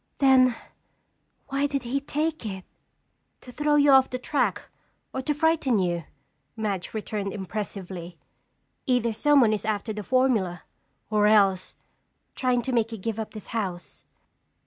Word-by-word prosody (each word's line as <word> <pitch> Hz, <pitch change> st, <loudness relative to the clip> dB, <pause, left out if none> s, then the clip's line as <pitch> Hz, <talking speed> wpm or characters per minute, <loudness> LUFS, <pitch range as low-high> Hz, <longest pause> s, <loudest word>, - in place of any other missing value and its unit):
"Then 260 Hz, -3 st, +5 dB, 0.9 s
why 275 Hz, +1 st, +1 dB
did 275 Hz, -2 st, -2 dB
he 250 Hz, +3 st, -1 dB
take 310 Hz, +2 st, -2 dB
it?" 190 Hz, -4 st, -6 dB, 0.8 s
"To 250 Hz, -, -11 dB
throw 295 Hz, +3 st, +1 dB
you 290 Hz, -1 st, +5 dB
off 265 Hz, -1 st, +6 dB
the 255 Hz, -, -3 dB
track 280 Hz, +3 st, -1 dB, 0.5 s
or 265 Hz, -, -2 dB
to 280 Hz, -, -1 dB
frighten 300 Hz, -5 st, +2 dB
you," 175 Hz, -4 st, -1 dB, 0.5 s
Madge 205 Hz, -3 st, -3 dB
returned 210 Hz, -2 st, -3 dB
impressively. 190 Hz, -3 st, -6 dB, 0.7 s
"Either 245 Hz, -3 st, +2 dB
someone 250 Hz, -1 st, +4 dB
is 210 Hz, -, -2 dB
after 215 Hz, +1 st, -2 dB
the 210 Hz, -, -5 dB
formula 220 Hz, -8 st, +1 dB, 0.5 s
or 210 Hz, -1 st, +4 dB
else 195 Hz, -3 st, +3 dB, 0.6 s
trying 250 Hz, -2 st, 0 dB
to 260 Hz, -, -3 dB
make 230 Hz, -1 st, +1 dB
you 225 Hz, -, -5 dB
give 220 Hz, +2 st, -4 dB
up 220 Hz, 0 st, -6 dB
this 215 Hz, -, -9 dB
house." 190 Hz, -6 st, -4 dB
225 Hz, 145 wpm, -26 LUFS, 200-265 Hz, 0.9 s, off